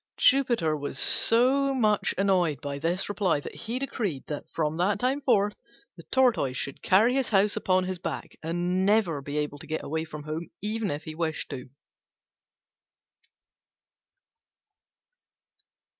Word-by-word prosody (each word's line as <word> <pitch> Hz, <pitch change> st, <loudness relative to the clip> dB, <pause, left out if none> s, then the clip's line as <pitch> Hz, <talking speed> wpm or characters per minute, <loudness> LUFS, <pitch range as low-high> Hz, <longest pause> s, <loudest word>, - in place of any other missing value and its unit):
Jupiter 240 Hz, -, +3 dB
was 145 Hz, -2 st, -5 dB
so 265 Hz, -, +4 dB
much 215 Hz, -5 st, +2 dB
annoyed 180 Hz, -7 st, +2 dB
by 140 Hz, 0 st, -5 dB
this 170 Hz, +5 st, -1 dB
reply 200 Hz, -7 st, +1 dB
that -, -, -8 dB
he 230 Hz, +3 st, -4 dB
decreed 215 Hz, -, -3 dB
that 150 Hz, -, -6 dB
from 155 Hz, -1 st, -1 dB
that 190 Hz, +4 st, +1 dB
time 260 Hz, +3 st, 0 dB
forth 205 Hz, -6 st, +1 dB, 0.3 s
the -, -, -11 dB
Tortoise 240 Hz, -, +2 dB
should 140 Hz, -, -4 dB
carry 220 Hz, +6 st, +4 dB
his 270 Hz, -1 st, 0 dB
house 205 Hz, 0 st, +3 dB
upon 185 Hz, 0 st, +2 dB
his 185 Hz, -1 st, -4 dB
back, -, -, -5 dB
and 175 Hz, +3 st, -1 dB
never 195 Hz, -7 st, +2 dB
be 145 Hz, +2 st, -5 dB
able 150 Hz, -1 st, -2 dB
to 155 Hz, -, -11 dB
get 155 Hz, +1 st, -3 dB
away 160 Hz, +2 st, -2 dB
from 150 Hz, -2 st, -8 dB
home 155 Hz, +3 st, -5 dB
even 215 Hz, 0 st, -2 dB
if 145 Hz, +2 st, -4 dB
he 155 Hz, -, -7 dB
wished 160 Hz, -1 st, -3 dB
to. 130 Hz, -1 st, -7 dB
185 Hz, 145 wpm, -27 LUFS, 155-220 Hz, 0.3 s, so